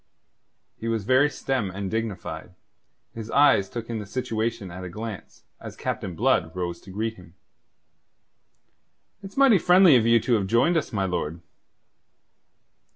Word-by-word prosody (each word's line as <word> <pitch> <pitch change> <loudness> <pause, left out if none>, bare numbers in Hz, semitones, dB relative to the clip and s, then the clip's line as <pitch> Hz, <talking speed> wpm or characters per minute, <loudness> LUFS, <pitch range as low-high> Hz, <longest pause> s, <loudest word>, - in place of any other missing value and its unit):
He 115 - -6
was 115 -2 -1
very 130 +6 +4
stern 130 -6 -2
and 95 +1 -5
dignified. 95 -6 -5 0.6
His 115 -1 -8
eyes 135 -9 +4
took 115 -1 -6
in 115 -2 -4
the 105 - -8
situation 110 -3 -3
at 90 +1 -8
a 90 - -6
glance, 110 +2 -8 0.2
as - - -9
Captain 90 -3 -4
Blood 95 -8 +1
rose 85 -2 -4
to 95 - -15
greet 110 +4 -3
him. 90 -2 -16 1.9
"It's 195 +3 -11
mighty 265 -8 +6
friendly 180 -3 +6
of 115 -1 +1
you 115 0 +5
to 120 - -1
have 100 -4 +1
joined 120 - +3
us, 160 - -1
my 100 -4 -1
lord." 85 -3 -3
110 Hz, 155 wpm, -25 LUFS, 95-125 Hz, 1.9 s, mighty